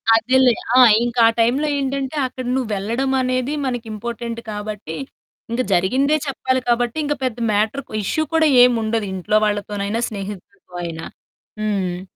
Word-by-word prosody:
అదేలే 255 +2 +4 0.2
ఆ! - - +8 0.3
ఇంకా 240 0 -2
ఆ - - +4
టైమ్‌లో 255 +7 +2
ఏంటంటే, 275 0 -2
అక్కడ 255 0 -8
నువ్వెళ్ళడం 230 +3 -1
అనేది 255 +2 -1
మనకి 245 -3 -3
ఇంపార్టెంట్ 235 +1 -5
కాబట్టి, 210 -5 -6 0.6
ఇంక 235 +2 0
జరిగిందే 260 +12 +2
చెప్పాలి 260 -1 -1
కాబట్టి, 240 +2 +1
ఇంక 295 - 0
పెద్ద 255 -3 -1 0.2
మ్యాటర్ 220 +7 0
కు - - -14
ఇష్యూ 315 +10 0
కూడా 320 -1 +4 0.2
ఏముండదు. 225 -3 +1
ఇంట్లో 190 +3 +1
వాళ్ళతోనైనా, 205 +1 -2
స్నేహితులతో 200 -2 -9
అయినా. 165 -1 -6 0.6
హ్మ్. 190 -4 -1
230 Hz, 140 wpm, -20 LUFS, 205-255 Hz, 0.6 s, ఆ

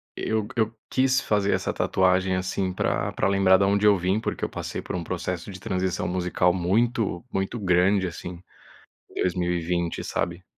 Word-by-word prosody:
eu 110 -1 -1
eu 110 0 0
quis 130 0 +2
fazer 100 -1 +1
essa - - -1
tatuagem, 95 0 +2
assim, 95 0 -1
pra - - -1
pra - - 0
lembrar 95 -1 +5
da 100 - +2
onde 100 +1 +2
eu 100 -2 +6
vim. 95 +4 0
Porque - - -3
eu - - -4
passei - - -5
por 90 - -4
processo 90 +2 -4
de 95 - -9
transição 95 0 -2
musical 90 0 +1
muito, 105 +2 0
muito 95 +5 -2
grande, 95 +1 +3
assim, 90 +1 -7 0.7
em - - -19
2020, 85 -1 -1
sabe. 85 +2 -3
95 Hz, 165 wpm, -25 LUFS, 90-100 Hz, 0.7 s, eu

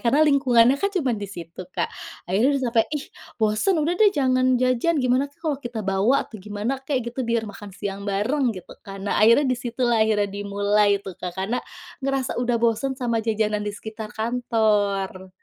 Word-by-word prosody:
karena 280 +6 +4
lingkungannya 260 -2 +4
kan 400 - +2
cuman 255 -9 +1
di 205 - -3
situ 170 +1 -9 0.2
Kak. 170 - 0 0.4
Akhirnya 230 +11 +2
sampai, 230 -2 +3
"ih 280 - -5 0.3
bosen, 220 - +2
udah 340 - +1
deh 430 - +8
jangan 255 -1 +2
jajan, 255 +6 +1
gimana 255 +1 +2
tuh 285 - -31
kalau 295 -4 0
kita 240 -3 -5
bawa, 195 +6 +2
atau 215 -4 -11
gimana 210 +4 -3
kek 265 -3 -2
gitu, 240 +2 -5
biar 230 -1 +1
makan 205 -1 -9
siang 200 -1 -4
bareng" 245 +7 +1
gitu 180 - -10
kan. 195 0 -8
Nah - - 0
akhirnya 230 +7 +6
di - - -1
situlah 240 -1 +1
akhirnya 210 -2 +2
dimulai 205 +1 +1
itu 195 -1 -8
Kak, 180 -1 -4
karena 200 +6 -1 0.4
ngerasa 270 -1 -1
udah 240 -1 +1
bosen 235 +3 0
sama 235 -3 0
jajanan 215 -1 0
di 205 0 -3
sekitar 220 0 -7
kantor. 210 -5 0
230 Hz, 185 wpm, -23 LUFS, 205-255 Hz, 0.4 s, deh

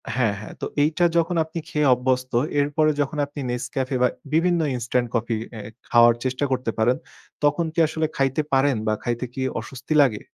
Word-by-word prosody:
হ্যাঁ, 120 -5 +2
হ্যাঁ। 105 - -9
তো - - -1 0.2
এইটা 155 +4 +2
যখন 170 +1 +1
আপনি 160 +1 -6
খেয়ে 150 -2 +1
অভ্যস্ত 125 +1 0 0.3
এরপরে 145 +2 +2
যখন 145 +2 -2
আপনি 145 +1 -10
Nescafe 130 +2 -2
বা - - +6 0.3
বিভিন্ন 170 +2 +3 0.2
ইনস্টেন্ট 120 0 -1
কফি 115 0 0 0.2
এ 105 - -6 0.3
খাওয়ার 120 0 +6
চেষ্টা 130 +2 -1
করতে 125 -3 0
পারেন 120 +3 +2 0.5
তখন 145 +3 +2
কি - - -1
আসলে 160 0 -1
খাইতে 135 +1 +1
পারেন 135 0 +3
বা 110 - +2
খাইতে 120 +1 -2
কি 130 - -5 0.2
অস্বস্তি 130 +3 -5
লাগে? 120 -7 +2
130 Hz, 180 wpm, -23 LUFS, 120-150 Hz, 0.5 s, বা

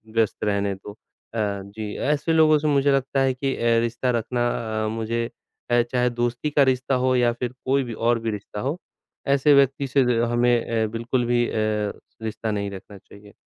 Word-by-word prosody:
व्यस्त 115 -2 +1
रहने 100 -1 0
दो 95 +2 -10
अ, - - -27 0.4
जी। 105 0 -3
ऐसे 150 +3 0
लोगों 155 -1 +5
से 155 - -1
मुझे 140 -1 +3
लगता 135 0 +1
है 135 -1 +2
कि 135 +1 -2
अ, 115 0 +2
रिश्ता 120 +2 -1
रखना 120 +1 -1 0.4
अ, - - 0
मुझे 115 +1 -2 0.5
अ, 120 0 +5
चाहे 125 -1 +2
दोस्ती 120 +4 -2
का 145 -1 +4
रिश्ता 130 0 +1
हो 130 0 +3
या 120 -1 +3
फिर 120 0 -4
कोई 135 +1 +2
भी 120 -2 -6
और 120 -1 +3
भी 115 0 -2
रिश्ता 105 0 -7
हो। 140 +8 -2 0.5
ऐसे 140 +1 +4
व्यक्ति 140 0 +3
से 135 +2 +2 0.3
हमें 120 0 +3 0.3
अ, - - -2
बिल्कुल 115 +2 -1
भी 120 0 +2
अ, - - -6 0.7
रिश्ता 110 0 -3
नहीं 100 -1 -2
रखना 100 +1 -10
चाहिए। 100 +1 -16
120 Hz, 190 wpm, -23 LUFS, 110-135 Hz, 0.7 s, लोगों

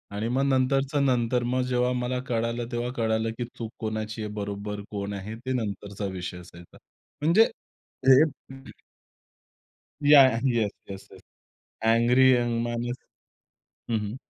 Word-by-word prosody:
आणि 110 +3 -2
मग 135 +2 +2
नंतरच्या 135 +2 +1
नंतर. 125 -2 +1
मग 125 +1 0
जेव्हा 125 0 +2
मला 125 0 -2
कळालं, 115 0 -1
तेव्हा 120 +1 -2
कळालं 110 -1 0
की 120 - -2
चूक 115 -1 -5
कोणाची 110 0 -4
आहे 105 - -5
बरोबर 105 0 -5
कोण 100 -1 -4
आहे 100 +3 -6
ते 130 - -1
नंतरचा 100 0 -5
विषय 90 0 -5
असायचा. 85 -1 -14 0.4
म्हणजे 170 +9 +5 0.7
हे 135 +2 +8 1.9
या 145 -1 +9
yeah 115 - -1
yes 110 -3 +1 0.2
yes 95 0 -8
yes. - - -14 0.7
Angry 125 +3 +5
young 120 -2 +1
माणूस. 120 +1 -3 1.0
हं, 115 - +2
हं. 105 +2 -5
115 Hz, 140 wpm, -26 LUFS, 105-125 Hz, 1.9 s, या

